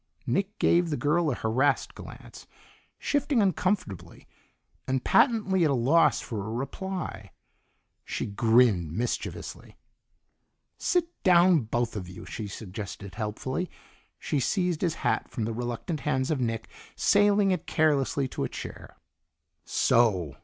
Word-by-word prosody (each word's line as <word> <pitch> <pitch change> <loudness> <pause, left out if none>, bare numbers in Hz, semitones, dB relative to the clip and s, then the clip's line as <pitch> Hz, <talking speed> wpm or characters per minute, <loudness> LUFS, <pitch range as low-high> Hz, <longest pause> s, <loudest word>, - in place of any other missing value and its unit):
Nick 200 +2 -1
gave 170 0 +3
the 150 - -1
girl 155 +2 +1
a 130 - 0
harassed 130 +6 +1
glance, - - -11 0.5
shifting 285 -3 0
uncomfortably, 185 - -1 0.6
and 130 -1 0
patently 210 -8 +3
at 155 - +3
a 140 - +2
loss 140 +8 +4
for 110 -5 -5
a 105 - -6
reply. 140 - -5 0.7
She - - -3
grinned 110 -5 +3
mischievously. 120 +7 -4 1.0
"Sit 355 -2 +2 0.2
down, 175 - +5
both 120 +1 -1
of 90 -4 -5
you," 90 - -10
she 110 - -6
suggested 100 -1 -7
helpfully. 120 - -3 0.5
She 150 - -1
seized 180 - 0
his 170 -3 0
hat - - +1
from 115 -5 -3
the 115 - -2
reluctant 120 +7 -3
hands 130 -1 0
of 145 -4 0
Nick, 115 -2 -2 0.3
sailing 205 -1 +4
it 180 -4 -2
carelessly 140 -3 +1
to - - -3
a - - -2
chair. - - -9 0.7
"So!" 95 - +2
135 Hz, 130 wpm, -27 LUFS, 110-180 Hz, 1.0 s, down